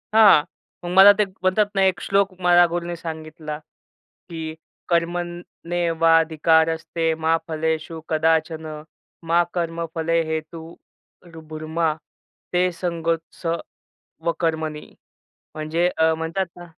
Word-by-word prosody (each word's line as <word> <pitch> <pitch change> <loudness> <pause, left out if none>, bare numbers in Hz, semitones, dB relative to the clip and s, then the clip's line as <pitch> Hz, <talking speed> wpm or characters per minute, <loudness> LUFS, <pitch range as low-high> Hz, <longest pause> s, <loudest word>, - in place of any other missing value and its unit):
हां, 205 -9 +7 0.4
मग - - -3
मला 195 +1 +10
ते - - +6
म्हणतात 190 +2 +1
ना 195 - +2
एक 190 - +1
श्लोक 195 -1 +1
मला 175 0 +6
गुरुने 175 0 -3
सांगितला, 155 -2 -7 0.7
की 160 -2 -6 0.3
"कर्मनेवाधिकारस्ते 165 -2 +1
मा 165 +1 +4
फलेषु 160 0 -2
कदाचन, 160 0 +1 0.6
मा 170 +1 +5
कर्मफले 165 -1 -1
हेतु 160 +1 -5 0.9
भुरमा 155 0 -1 0.6
ते 180 +1 +2
संगोत्स 165 -1 -3 0.8
व 170 - +2
कर्मणी." 160 -2 -2 0.7
म्हणजे 160 +3 0
अ, 160 0 +3
म्हणतात 165 +4 -2
ना 175 0 -10
165 Hz, 100 wpm, -22 LUFS, 160-175 Hz, 0.9 s, मला